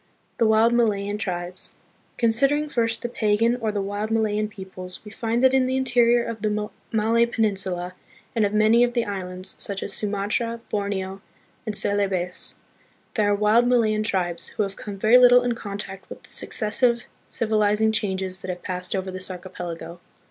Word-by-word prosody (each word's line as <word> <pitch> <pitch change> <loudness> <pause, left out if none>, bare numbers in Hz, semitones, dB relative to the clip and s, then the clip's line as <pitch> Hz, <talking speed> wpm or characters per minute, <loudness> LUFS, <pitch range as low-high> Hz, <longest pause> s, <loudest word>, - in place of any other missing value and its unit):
The 230 - +4
Wild 220 +2 +4
Malayan 205 -3 +1
Tribes. 180 -1 -3 0.4
Considering 275 +6 +2
first 230 -3 0
the - - 0
pagan 230 +1 +1
or 225 -3 -1
the 205 -1 -2
wild 205 +2 -3
Malayan 215 -1 +1
peoples, 190 -3 -8
we 210 - -9
find 230 +2 -1
that 260 0 +5
in 260 -1 +3
the 260 0 0
interior 240 -2 +3
of 230 -2 -6
the 210 0 -1 0.2
Malay 230 +1 +2
Peninsula 190 -6 0 0.4
and 225 - +2
of 200 - +1
many 215 +3 +4
of 240 0 +1
the 235 -1 0
islands, 185 -1 -4
such 200 -1 -3
as 200 - -4
Sumatra, 210 +3 -2
Borneo 195 -2 -3 0.5
and 210 -1 +4
Celebes, 190 -3 +2 0.6
there 210 -2 +2
are - - +3
wild 215 +4 +3
Malayan 220 -4 +2
tribes, 175 -5 -1
who 215 - -2
have 195 -1 -4
come 205 -2 -7
very 220 +5 +6
little 245 0 +7
in 245 -1 0
contact 200 -3 -7
with - - -10
the - - -16
successive 235 +2 0 0.3
civilizing 215 -1 +1
changes 190 -3 -2
that 185 - -7
have 180 -1 -5
passed 180 +1 -3
over 190 0 -3
this 185 +1 -4
archipelago. 175 -2 -7
210 Hz, 170 wpm, -24 LUFS, 190-230 Hz, 0.6 s, little